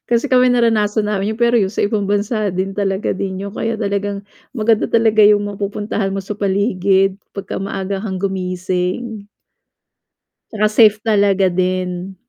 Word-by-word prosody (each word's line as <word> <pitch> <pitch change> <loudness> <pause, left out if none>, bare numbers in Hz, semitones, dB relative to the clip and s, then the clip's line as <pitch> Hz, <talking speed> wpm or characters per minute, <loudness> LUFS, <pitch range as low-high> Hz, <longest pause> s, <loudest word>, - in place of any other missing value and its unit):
Kasi 240 +4 +1
kami 250 -1 +4
naranasan 220 -3 +1
namin 210 +1 -1
'yon, 220 - -9
pero 235 0 +3
yu 195 -4 +1
sa - - -2
ibang 205 0 -1
bansa 205 0 -1
din 190 +2 -3
talaga 195 -1 -1
din 190 -1 -4
'yon, 200 0 -6
kaya 225 0 -2
talagang 200 -1 -2 0.3
maganda 225 -2 +1
talaga 220 -2 +4
'yong 205 0 +5
mapupuntahan 205 0 -3
mo 195 - -2
sa 195 +2 -6
paligid 195 -1 +1 0.2
pagka 200 - -6
maaga 195 0 -3
kang 190 -3 -4
gumising. 185 +3 -3 1.3
'Tsaka 215 -1 +1
safe 215 -1 +5
talaga 200 -3 +2
din. 185 +1 -2
200 Hz, 150 wpm, -18 LUFS, 190-215 Hz, 1.3 s, yong